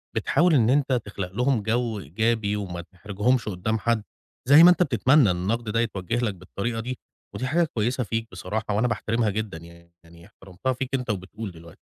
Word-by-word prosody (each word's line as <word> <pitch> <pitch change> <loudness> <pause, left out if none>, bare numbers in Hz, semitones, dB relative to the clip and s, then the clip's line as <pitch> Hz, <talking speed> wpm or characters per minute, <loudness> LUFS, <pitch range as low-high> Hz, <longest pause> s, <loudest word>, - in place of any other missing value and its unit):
بتحاول 175 0 +2
إن 120 -6 +4
أنت 135 0 +2
تخلق 100 -3 -5
لهم 125 +2 +1
جو 115 -1 -1
إيجابي 105 +6 0
وما 90 -4 -4
تحرجهُمش 105 +7 -1
قدّام 110 +4 -2
حد، 115 0 0 0.4
زي 145 +4 +8
ما 175 - +10
أنت 180 0 +4
بتتمنى 130 - +4
إن 90 - -2
النقد 110 +5 -2
ده 115 +2 0
يتوجّه 115 -2 -2
لك 115 -4 0
بالطريقة 100 +5 -4
دي، 125 +2 -5 0.4
ودي 130 - -3
حاجة 170 +6 +2
كويسة 125 -3 -1
فيك 115 +1 -3
بصراحة، 110 -1 -3
وأنا 115 +4 +2
باحترمها 115 0 0
جدًا 105 -3 -3
يعني، 85 +1 -15
يعني 85 0 -17
احترمتها 95 +9 -5
فيك 130 0 -4
أنت 125 -2 -4
وبتقول 100 +1 -4
دلوقتي، 85 -1 -15
110 Hz, 185 wpm, -25 LUFS, 95-125 Hz, 0.4 s, ما